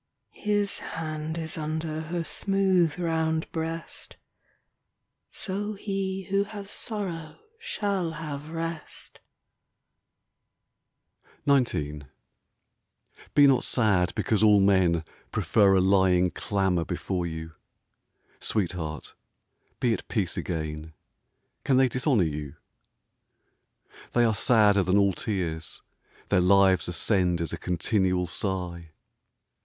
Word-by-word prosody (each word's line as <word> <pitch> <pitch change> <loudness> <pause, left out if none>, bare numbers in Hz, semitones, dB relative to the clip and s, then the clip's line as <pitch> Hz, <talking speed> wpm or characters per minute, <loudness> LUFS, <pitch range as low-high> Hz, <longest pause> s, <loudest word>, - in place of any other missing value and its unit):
His 205 -1 +1
hand 155 0 -5
is 165 +1 -3
under 155 0 -3
Her 165 +2 -3
smooth 190 -4 +2
round 160 -2 -1
breast 165 0 -5 1.1
So 205 +2 -3
he 195 -1 -3
who 195 +2 +1
has 200 -1 -8
sorrow 185 -8 -5 0.2
Shall 200 - -2
have 150 -2 -6
rest. 165 -1 -5 2.3
XIX 75 - +1 1.3
Be 145 - +8
not 135 -3 +4
sad 100 -7 +2
because 110 -2 0
all 105 -2 +6
men 95 -4 +3 0.3
Prefer 100 -3 +3
a - - +5
lying 95 -1 +3
clamour 95 -1 0
before 90 +2 -3
you: 80 0 -6 0.9
Sweetheart, 85 -7 -3 0.7
be 120 -2 +2
at - - -5
peace 100 -8 -1
again 80 -1 -4 0.3
— - - -49
Can 135 -2 +3
they 130 0 +5
dishonour 125 - +2
you? 75 -3 -4 1.6
They 120 - +4
are 110 - +2
sadder 105 -2 +4
than 95 +2 +2
all 100 -1 +4
tears; 85 -7 -4 0.5
Their 90 - +4
lives 95 -1 +4
ascend 90 0 +1
as 85 0 -3
a - - -3
continual 90 +1 +1
sigh. 85 -2 -3
110 Hz, 105 wpm, -27 LUFS, -, 2.3 s, Be